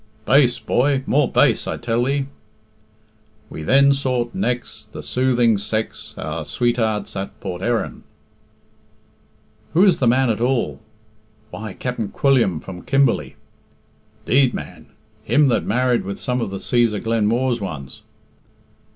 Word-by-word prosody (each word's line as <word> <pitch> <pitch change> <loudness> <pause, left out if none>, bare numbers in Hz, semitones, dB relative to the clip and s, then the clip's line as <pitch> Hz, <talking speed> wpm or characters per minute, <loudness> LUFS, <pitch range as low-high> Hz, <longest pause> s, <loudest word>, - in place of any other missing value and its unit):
"Bass, 130 -2 +4
boy 130 +4 +1
more 140 -2 +2
bass, - - +3
I - - -2
tell 120 +1 -1
thee." 140 +1 0 1.3
"We - - -7
then 140 - +5
sought 125 -3 -1
nex' 125 -11 -3
The - - -8
soothing 120 -4 +2
sex, 110 +2 -4
Our - - -4
swatearts 115 -4 -1
at 95 0 -6
Port 90 0 -6
Erin." 120 +2 -1 1.7
"Who 175 +4 +5
is 190 -4 +4
the 125 - +2
man 125 +1 +3
at 110 - -3
all?" 125 0 0 0.7
"Why, 110 -3 -7
Capt'n 120 -3 -4
Quilliam 120 - +2
from 90 +1 -9
Kimberley." 120 - +1 0.9
"'Deed, 130 +1 +3
man! - - -8 0.4
Him 145 -2 +3
that 120 - +1
married 125 +2 +1
with 100 0 -6
some 125 0 -2
of 115 - -2
the 95 - -5
Cæsar 115 -2 +1
Glenmooar's 115 +2 0
ones?" 75 -9 -7
120 Hz, 135 wpm, -21 LUFS, 110-130 Hz, 1.7 s, then